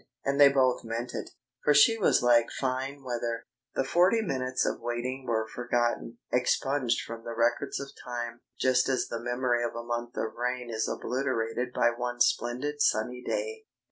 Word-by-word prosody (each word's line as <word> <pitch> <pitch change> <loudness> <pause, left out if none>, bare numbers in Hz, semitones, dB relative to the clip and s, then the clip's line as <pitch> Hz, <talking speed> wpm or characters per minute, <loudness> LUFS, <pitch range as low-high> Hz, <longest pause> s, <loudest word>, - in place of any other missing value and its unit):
And 140 +1 0
they 140 - +10
both 130 -2 +2
meant 115 +2 -4
it. - - -5 0.3
For 150 - +4
she 150 +10 +7
was 215 - +3
like 120 -1 +5
fine 135 +1 -3
weather. 120 -2 -3 0.3
The - - +2
forty 185 +10 +3
minutes 130 -7 -1
of - - -2
waiting 125 +2 -3
were 110 -1 0
forgotten, 120 -1 -1 0.2
expunged 125 0 +1
from 115 0 -8
the 115 0 -6
records 120 +4 +1
of 140 0 -7
time, 120 -1 -5 0.2
just 130 0 +3
as 130 -2 +1
the 115 - -4
memory 120 0 0
of 120 - -3
a 115 - -4
month 120 0 -4
of 110 - -2
rain 125 0 -3
is 110 0 -1
obliterated 125 -1 -2
by 120 - +3
one 120 0 -4
splendid 130 +5 +1
sunny 125 0 +1
day. 450 -3 -3
125 Hz, 175 wpm, -29 LUFS, 120-135 Hz, 0.3 s, they